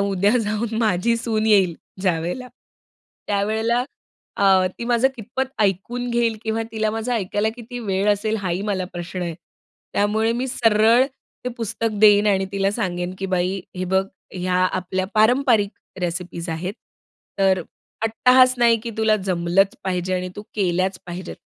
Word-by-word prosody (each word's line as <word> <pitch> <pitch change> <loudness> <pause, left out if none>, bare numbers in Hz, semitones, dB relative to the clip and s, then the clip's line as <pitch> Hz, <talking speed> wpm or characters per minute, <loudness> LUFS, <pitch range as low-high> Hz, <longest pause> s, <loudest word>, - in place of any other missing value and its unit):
उद्या 200 +3 +2
जाऊन 215 +1 -2
माझी 220 +1 +2
सून 220 -2 -1
येईल 190 -6 +4 0.3
ज्यावेळेला 180 +8 -1 0.8
त्यावेळेला 220 +4 +1 0.5
अ, 190 -2 +4
ती 235 - -4
माझं 240 +2 +3
कितपत 250 +4 -3 0.2
ऐकून 235 +6 -1
घेईल 235 -2 +1
किंवा 225 0 -1
तिला 220 -1 0
माझं 225 +3 -3
ऐकायला 205 0 0
किती 245 +1 -8
वेळ 195 -1 0
असेल? 215 +2 -1
हाही 185 -1 -2
मला 195 -3 -1
प्रश्न 175 +1 -5
आहे. 170 -2 -3 0.6
त्यामुळे 220 +3 +1
मी 250 +2 -2
सरळ 225 +1 +4 0.4
ते 250 - 0
पुस्तक 230 0 -2
देईन 210 -1 +6
आणि 195 -2 +2
तिला 195 0 +1
सांगेन 180 -4 -2
की 195 - -3
बाई, 185 +1 0 0.2
हे 185 - -2
बघ 190 +1 +1 0.3
ह्या 180 0 -1 0.2
आपल्या 185 +1 -2
पारंपारिक 220 -2 +4 0.3
रेसिपीज 175 0 -4
आहेत. 175 +5 -3 0.6
तर, 190 -2 +3 0.4
अट्टाहास 255 +3 +5
नाही 235 -1 +5
की 235 - -4
तुला 220 -1 +3
जमलंच 180 +2 +2
पाहिजे 185 0 -1
आणि 185 0 -2
तू 205 - -6
केल्याच 185 -1 0
पाहिजेत. 180 +2 -7
205 Hz, 150 wpm, -22 LUFS, 185-225 Hz, 0.8 s, देईन